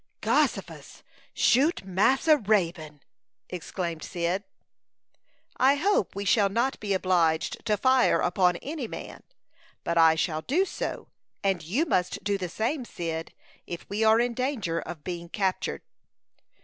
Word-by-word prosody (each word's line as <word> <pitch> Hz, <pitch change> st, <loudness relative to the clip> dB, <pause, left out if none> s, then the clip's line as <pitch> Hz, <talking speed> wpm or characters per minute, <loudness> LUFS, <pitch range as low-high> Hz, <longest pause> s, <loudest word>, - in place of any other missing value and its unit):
"Gossifus! -, -, -1 dB, 0.3 s
Shoot 280 Hz, -, +2 dB
Massa 260 Hz, -, +3 dB
Raybone!" 170 Hz, -, -1 dB, 0.5 s
exclaimed 170 Hz, -2 st, -4 dB
Cyd. 175 Hz, +4 st, -2 dB, 1.1 s
"I 270 Hz, +2 st, +5 dB
hope 330 Hz, -, +1 dB
we 200 Hz, +1 st, -4 dB
shall 200 Hz, +1 st, +3 dB
not 240 Hz, +6 st, 0 dB
be 205 Hz, -2 st, -1 dB
obliged 175 Hz, -4 st, +1 dB
to 210 Hz, -1 st, +2 dB
fire 260 Hz, +3 st, +3 dB
upon 180 Hz, 0 st, +2 dB
any 290 Hz, -4 st, -4 dB
man; -, -, -8 dB, 0.6 s
but 170 Hz, 0 st, 0 dB
I 160 Hz, -1 st, +6 dB
shall 160 Hz, -1 st, -1 dB
do 330 Hz, -, +1 dB
so, -, -, -5 dB, 0.3 s
and 195 Hz, -3 st, +1 dB
you 210 Hz, -, 0 dB
must 180 Hz, -, -1 dB
do 200 Hz, -1 st, 0 dB
the 180 Hz, -2 st, -3 dB
same, 245 Hz, -, -2 dB
Cyd, 165 Hz, -7 st, -5 dB, 0.4 s
if 170 Hz, -, -7 dB
we 210 Hz, +2 st, 0 dB
are 220 Hz, +1 st, +5 dB
in 240 Hz, 0 st, +1 dB
danger 235 Hz, -, -2 dB
of 160 Hz, -3 st, -8 dB
being 170 Hz, -2 st, -6 dB
captured." 190 Hz, 0 st, -2 dB
195 Hz, 135 wpm, -27 LUFS, 170-245 Hz, 1.1 s, I